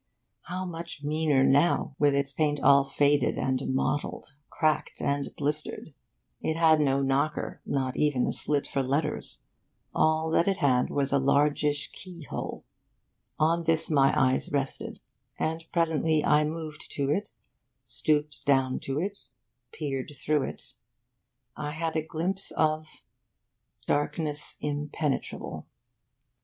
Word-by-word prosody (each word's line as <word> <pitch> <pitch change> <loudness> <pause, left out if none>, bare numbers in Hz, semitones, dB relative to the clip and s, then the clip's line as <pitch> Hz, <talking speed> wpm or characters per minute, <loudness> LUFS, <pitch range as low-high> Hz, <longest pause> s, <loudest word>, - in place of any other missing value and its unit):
How 185 +2 -4
much 170 -3 -6
meaner 150 -2 +2
now, 140 +1 +3
with 145 -1 +4
its 140 0 0
paint 145 +1 0
all 140 0 +6
faded 140 0 +2
and 130 0 0
mottled, 140 +2 -2
cracked 155 -1 0
and 140 0 -1
blistered! 150 +1 -2 0.5
It 160 - -1
had 160 -2 +5
no 140 -1 +2
knocker, 140 +3 -1
not 130 -2 -1
even 145 -4 +2
a - - 0
slit 145 -1 +1
for 135 - -1
letters. 145 +4 -2 0.5
All 160 0 +2
that 170 - +3
it 195 -1 +2
had 125 -3 +2
was 140 -1 0
a 140 - +4
large 140 +3 +2
ish 145 -1 0
key 180 -3 -10
hole. - - -6 0.7
On 165 +2 +2
this 160 0 +3
my 135 -2 +5
eyes 130 -1 +2
rested; 140 -2 -2 0.4
and 160 +1 -2
presently 160 -2 +1
I 150 0 +4
moved 155 0 -5
to 140 -1 0
it, 205 +6 -1 0.6
stooped 150 -1 0
down 135 -2 +2
to 135 +2 -3
it, 200 +4 -4 0.4
peered 140 -3 -4
through 150 -2 +1
it. - - -11 0.8
I 150 0 -4
had 160 0 -3
a 160 - +2
glimpse 170 +5 -2
of 155 0 +1 1.0
darkness 150 0 0
impenetrable. 150 0 -3
150 Hz, 135 wpm, -28 LUFS, 140-160 Hz, 1.0 s, all